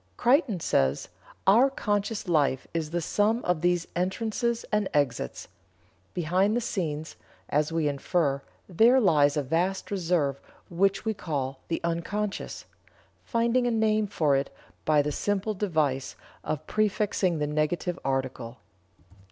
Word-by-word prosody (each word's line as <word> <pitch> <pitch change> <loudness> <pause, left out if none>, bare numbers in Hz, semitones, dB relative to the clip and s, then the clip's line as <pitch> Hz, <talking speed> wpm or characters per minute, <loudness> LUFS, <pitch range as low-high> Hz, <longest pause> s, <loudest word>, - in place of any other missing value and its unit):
Creighton 250 - +3
says: 70 - +1 0.4
"Our 230 +8 +6
conscious 205 -4 -2
life 145 -6 +2
is 160 -2 -2
the 175 +2 -2
sum 215 +8 +1
of 180 -3 +1
these 175 -1 +2
entrances 225 +6 -1
and 210 -2 +1
exits. 130 - -1 0.7
Behind 185 +5 +2
the - - +2
scenes, 160 -8 -3 0.3
as 150 +2 +1
we 165 -2 +1
infer, 140 0 0 0.3
there 230 +8 +5
lies 150 - +4
a 145 - +1
vast 175 +9 -1
reserve 165 -8 0 0.3
which 195 +4 +1
we 220 - +1
call 140 -8 -3
'the 165 - -2
unconscious,' 195 +5 -3 0.6
finding 235 +1 +1
a - - +2
name 215 -2 +2
for 155 -8 +2
it 135 +1 0 0.4
by 150 -2 +4
the 150 - -2
simple 205 +6 -1
device 155 -10 -1 0.3
of 155 0 -3
prefixing 205 -4 +1
the 150 - 0
negative 155 +4 -1
article. 130 -3 -3
175 Hz, 135 wpm, -27 LUFS, 150-210 Hz, 0.7 s, Our